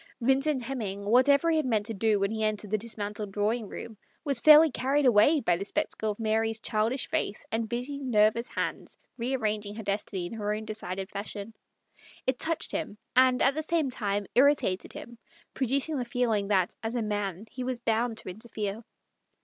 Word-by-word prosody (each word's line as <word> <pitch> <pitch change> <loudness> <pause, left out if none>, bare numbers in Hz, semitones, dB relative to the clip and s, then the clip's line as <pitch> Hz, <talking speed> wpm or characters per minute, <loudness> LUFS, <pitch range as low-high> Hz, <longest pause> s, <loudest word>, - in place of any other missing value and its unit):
Vin 265 +2 +3
cent 285 -3 0
Hemming, 210 -6 -4
whatever 280 +8 +4
he 320 - +2
had 310 - +1
meant 215 -4 +1
to 225 - -4
do 215 0 +2
when 200 +1 0
he 220 0 -2
entered 215 -1 -2
the 215 - +2
dismantled 210 -2 -5
drawing 215 +3 -1
room, 220 -3 -8 0.2
was 280 -5 0
fairly 310 +3 +8
carried 275 +3 +1
away 250 +6 +5
by 180 -7 +2
the 185 - -4
spectacle 220 -2 -2
of 210 - -4
Mary's 225 0 0
childish 225 +5 0
face 200 - -2
and 225 0 -1
busy, 250 +4 -3
nervous 235 -2 +2
little - - -1
hands - - -6 0.2
rearranging 215 -4 -1
her 220 - -6
destiny 200 -2 -2
in 175 - -6
her 210 -1 -2
own 215 +1 -6
decided 195 -3 -4
fashion. 205 +1 -5 0.7
It 260 -1 0
touched 330 0 -1
him, 205 - -4 0.2
and 255 0 +5
at 275 - +4
the 310 - -2
same 315 -3 0
time 205 -3 -1
irritated 260 -7 +3
him, 235 -1 -10 0.3
producing 275 +4 +1
the 250 - -1
feel 245 -1 0
ing 205 -2 0
that, 190 -3 +2
as 225 +2 -3
a 235 - 0
man, 205 -2 -3
he 255 - -5
was 255 0 -1
bound 230 0 0
to - - -7
interfere. 215 +1 -5
225 Hz, 195 wpm, -28 LUFS, 210-255 Hz, 0.7 s, fairly